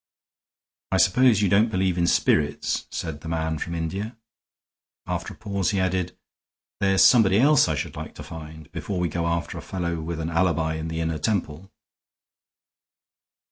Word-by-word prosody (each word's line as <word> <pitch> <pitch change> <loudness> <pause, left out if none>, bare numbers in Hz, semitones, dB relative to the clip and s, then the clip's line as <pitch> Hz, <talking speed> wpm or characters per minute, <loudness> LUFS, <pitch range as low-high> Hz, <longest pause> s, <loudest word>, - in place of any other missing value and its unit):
"I 95 - +2
suppose 105 +3 +4
you - - +4
don't 105 +5 +4
believe 95 -3 0
in 85 -1 +1
spirits?" 75 -3 +1
said 80 -3 -5
the 80 - -9
man 80 -1 -2
from 85 +2 -4
India. 95 +8 -4 0.9
After - - -4
a - - -28
pause 100 -3 -1
he 100 - 0
added: 90 -1 -1 0.6
"There's 95 -1 +4
somebody 105 -6 +6
else 145 +1 +5
I 80 - 0
should - - -4
like - - -7
to - - -8
find, 80 -1 -10
before 100 - -4
we 90 -1 0
go 85 +2 -2
after 85 0 -2
a - - -7
fellow 85 -3 -3
with 80 +1 -4
an 80 +1 -3
alibi 85 -2 +1
in 80 0 -4
the 80 0 -3
Inner 80 -1 -2
Temple. 95 -2 -2
85 Hz, 170 wpm, -24 LUFS, 80-95 Hz, 0.9 s, somebody